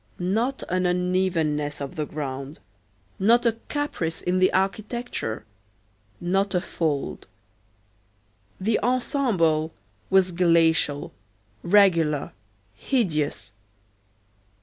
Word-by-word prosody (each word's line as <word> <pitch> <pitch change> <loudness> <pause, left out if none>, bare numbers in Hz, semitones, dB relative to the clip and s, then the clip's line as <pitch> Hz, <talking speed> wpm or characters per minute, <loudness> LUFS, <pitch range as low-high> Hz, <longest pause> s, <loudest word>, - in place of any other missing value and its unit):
Not 225 +9 -1
an 185 0 +1
unevenness 175 -5 0
of 140 -1 -6
the 150 -2 -2
ground, 140 0 -5 0.6
not 235 +5 +4
a 230 -1 +2
caprice 235 - -2
in 180 +1 0
the 185 - +4
architecture, 195 - -2 0.7
not 190 +2 0
a - - +4
fold. 155 -5 -3 1.3
The 215 +3 +1
ensemble 215 - +1 0.3
was 190 -1 +4
glacial, 165 -4 +2 0.5
regular, 170 -6 +3 0.4
hideous. 150 - -1
180 Hz, 85 wpm, -25 LUFS, 155-200 Hz, 1.3 s, not